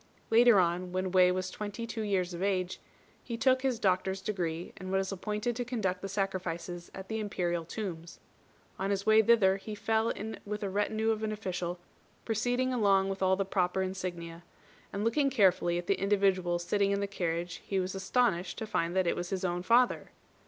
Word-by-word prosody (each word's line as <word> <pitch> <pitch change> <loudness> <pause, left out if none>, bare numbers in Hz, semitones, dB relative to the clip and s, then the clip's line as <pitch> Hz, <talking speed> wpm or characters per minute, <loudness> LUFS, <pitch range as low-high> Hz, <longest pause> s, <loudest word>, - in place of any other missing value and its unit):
Later 230 -2 +7
on, 180 +1 0
when 185 0 -1
Wei 180 -1 +5
was 185 0 -2
twenty 210 +2 -5
two 230 -1 -5
years 190 -4 0
of 170 - -6
age, 190 -2 0 0.4
he 235 -2 -5
took 260 +1 +3
his 260 -3 0
doctor's 190 -2 +1
degree, 175 -5 -3
and 185 0 -6
was 190 0 0
appointed 210 +4 -2
to 245 - -2
conduct 205 -7 -2
the 195 - -5
sacrifices 180 -3 -3
at 190 0 -8
the 220 0 -3
Imperial 175 -5 -1
tombs. 170 -2 -6 0.6
On 195 +1 -1
his 200 0 -1
way 220 0 +6
thither 200 -4 +4
he 210 +2 -7
fell 220 +2 +1
in 220 +1 -5
with 210 +1 -4
a 195 - -2
retinue 215 +2 +1
of 220 -1 -2
an 215 -1 -1
official, 180 -4 -3 0.5
proceeding 245 +3 0
along 195 -4 +3
with 195 0 -4
all 190 0 +4
the 195 +1 -1
proper 190 -1 0
insignia, 175 -3 -5 0.5
and, 200 +1 -3
looking 275 +5 +2
carefully 185 -8 +3
at 175 - -4
the 190 +1 0
individual 195 -3 +2
sitting 195 +3 +1
in 200 0 +1
the 200 - 0
carriage, 175 -2 -3
he 195 - -1
was 185 0 -2
astonished 190 -2 0
to 220 - -4
find 170 -4 -1
that 190 -1 +3
it 170 - +1
was 175 0 -4
his 190 -1 -2
own 175 0 -1
father. 235 +6 +3
195 Hz, 195 wpm, -30 LUFS, 180-215 Hz, 0.6 s, Later